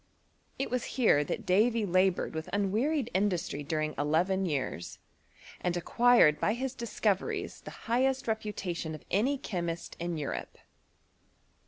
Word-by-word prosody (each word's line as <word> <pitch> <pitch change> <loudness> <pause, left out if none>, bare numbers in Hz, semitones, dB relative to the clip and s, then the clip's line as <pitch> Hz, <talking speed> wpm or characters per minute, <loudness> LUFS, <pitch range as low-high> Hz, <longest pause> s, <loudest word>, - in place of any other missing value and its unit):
It 270 - -2
was 250 -1 0
here 215 - +5
that - - -4
Davy 220 +4 +3
laboured 185 0 +2
with 160 0 -5
unwearied 230 +7 0
industry 185 -6 0
during 155 +1 -2
eleven 180 +6 +1
years, 135 - -3 0.6
and 180 -1 -1
acquired 230 -5 +5
by 215 - +1
his 260 +1 -3
discoveries 215 -5 -1
the - - -8 0.2
highest 255 +3 +1
reputation 190 -7 -3
of 155 - -13
aay 250 +10 +2
chemist 170 -3 -3
in 170 -1 -2
Europe. 145 -2 -4
190 Hz, 130 wpm, -30 LUFS, 165-235 Hz, 0.6 s, here